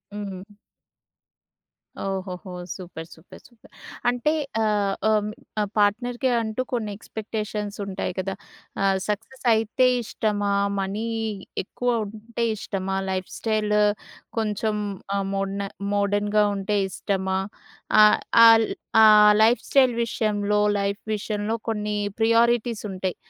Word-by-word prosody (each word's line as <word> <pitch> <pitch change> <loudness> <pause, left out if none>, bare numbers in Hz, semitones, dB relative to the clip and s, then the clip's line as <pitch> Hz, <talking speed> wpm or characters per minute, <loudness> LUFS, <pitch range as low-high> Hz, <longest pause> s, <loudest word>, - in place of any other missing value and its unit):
హ్మ్. 200 -1 -7 1.5
ఓహోహో! 190 -1 -4 0.2
Super. 170 -3 -9
Super. 160 +2 -15
Super. 235 -2 -22 0.4
అంటే, 245 +6 +1 0.3
ఆహ్, 205 -2 +1 0.2
ఆహ్, 215 -1 +2 0.5
పార్ట్‌నర్‍కి 240 +5 +1
అంటూ 220 +2 -2
కొన్ని 220 -4 -1
ఎక్స్‌పెక్టేషన్సుంటాయి 210 -3 -4
కదా! 190 0 -3 0.5
ఆహ్, 195 -1 +2
సక్ససయితే 225 +2 +1 0.2
ఇష్టమా? 205 -2 -1 0.3
మనీ 200 +4 -2 0.6
ఎక్కువ 245 +6 -3 0.2
ఉంటే 220 +3 -4
ఇష్టమా? 195 -1 -3
లైఫ్‌ 185 -1 -3
స్టైల్ 215 -2 0 0.6
కొంచం 215 0 -1 0.4
ఆహ్, 200 -1 0
మోడన 195 0 -2 0.3
మోడర్న్‌గా 205 +1 +2
ఉంటే 200 +1 -1
ఇష్టమా? 190 0 -2 0.7
ఆహ్, 210 - +6 0.3
ఆల్ 225 -1 +7 0.3
ఆ - - +8 0.4
లైఫ్‌ 230 +3 +4
స్టైల్ 260 -3 +4
విషయంలో, 210 -2 0 0.2
లైఫ్ 200 0 -2
విషయంలో 210 +1 -3
కొన్నీ 210 -1 -2 0.2
ప్రియోరిటీసుంటయి. 225 -5 +1
210 Hz, 100 wpm, -24 LUFS, 195-225 Hz, 1.5 s, ఆ